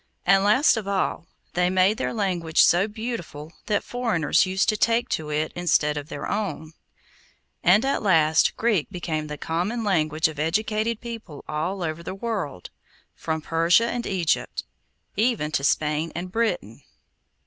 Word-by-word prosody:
And 195 0 +5
last 225 +6 +4
of 215 -3 -4
all, 190 -4 -1 0.3
they 180 0 +2
made 190 +4 +3
their - - -1
language 180 -7 +1
so 180 +4 +4
beautiful 210 -9 -6
that 210 -2 +1
foreigners 215 -10 +1
used 190 +1 +1
to 215 - +2
take 230 +2 +1
to 155 -1 -2
it 150 +1 -1
instead 155 -4 +2
of 145 +1 -6
their - - -5
own; 165 -7 -3 0.9
and 195 +8 +5
at 275 - 0
last 160 -6 +3
Greek 220 -9 +1
became 165 -5 -3
the 150 0 -6
common 180 +11 -2
language 160 -6 +1
of 155 -2 -8
educated 215 +7 0
people 225 - -8
all 175 +5 -2
over 160 0 -3
the 170 - -6
old 195 - -13
world, 195 - -3 0.4
from 160 -1 -3
Persia 165 +7 +3
and 240 -1 -3
Egypt 180 -4 -1 0.5
even 215 -8 +1
to 140 - -1
Spain 150 +3 +1
and 180 +2 -5
Britain. 180 - -2
180 Hz, 160 wpm, -24 LUFS, 155-215 Hz, 0.9 s, And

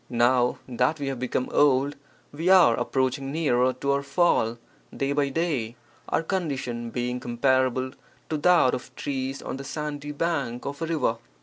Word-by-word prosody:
Now 125 +1 +3
(that 125 +5 +1
we 140 -1 -2
have 135 -3 -4
become 125 0 -1
old) 140 0 +3 0.4
we 165 +5 -1
are 185 -2 +6
ap - - -3
proaching 135 +1 0
nearer 130 -5 +2
to 135 +2 -2
our 140 0 +1
fall 135 -5 +2 0.4
day 135 0 0
by 140 -1 +1
day, 135 -7 -1 0.3
our - - +1
condition 135 -10 -3
being 125 +1 -2
comparable 130 +1 +1 0.4
to 155 - -1
that 165 -4 +4
of 125 - -6
trees 135 -1 -3
on - - -4
the 135 - -7
sandy 150 0 -5
bank 145 -6 -2
of 140 +3 -5
a 165 - -1
river. 150 -8 0
135 Hz, 170 wpm, -26 LUFS, 125-150 Hz, 0.4 s, are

